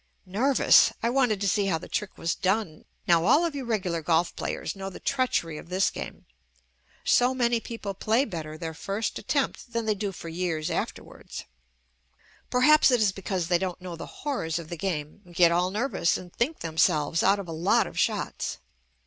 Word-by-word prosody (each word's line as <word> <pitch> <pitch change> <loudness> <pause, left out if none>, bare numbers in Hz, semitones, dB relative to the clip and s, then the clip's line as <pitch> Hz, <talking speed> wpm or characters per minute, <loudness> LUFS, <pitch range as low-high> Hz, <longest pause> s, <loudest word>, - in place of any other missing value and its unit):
Nerv 250 +9 +1
ous! - - +7
I 235 - +2
wanted 245 -6 +2
to 200 - +1
see 195 +1 +2
how 165 - +1
the - - -10
trick 210 -2 -3
was 165 - -1
done. 190 -4 -1 0.2
Now 170 -1 +4
all 310 - +4
of 335 - -2
you 275 -3 -5
regular 185 -8 -1
golf 165 +2 +1
players - - -4
know 195 0 -5
the 190 - -10
JUST - - 0
ME - - -5
treachery 165 -9 -1
of - - -13
this 185 +2 +2
game. - - -8 0.8
So 250 +1 +3
many 240 -2 +2
people 225 -3 -6
play 220 +7 +1
better 155 - -6
their 160 0 -5
first 200 +6 -3
attempt 265 0 -2
than 230 -1 -1
they 215 - +2
do 200 -1 -3
for 170 - -9
years 165 -2 -2
afterwards. - - -5 1.1
Perhaps 300 +5 +5
it 250 -2 +3
is 210 -3 +3
because 185 -2 -3
they 175 -1 +3
don't 185 -1 -3
know 180 -2 -7
the 165 - -8 0.2
horrors 250 - -1
of 165 -2 -7
the 175 - -4
game, 160 0 -4
get 170 -1 +5
all 175 +2 +2
nervous 210 -3 0
and 180 -1 -11
think 280 +7 -1
themselves 160 -1 +2
out 195 +1 +4
of 200 -3 -6
a - - -6
lot 165 +4 +2
of - - -6
shots. - - -1
190 Hz, 200 wpm, -27 LUFS, 170-230 Hz, 1.1 s, ous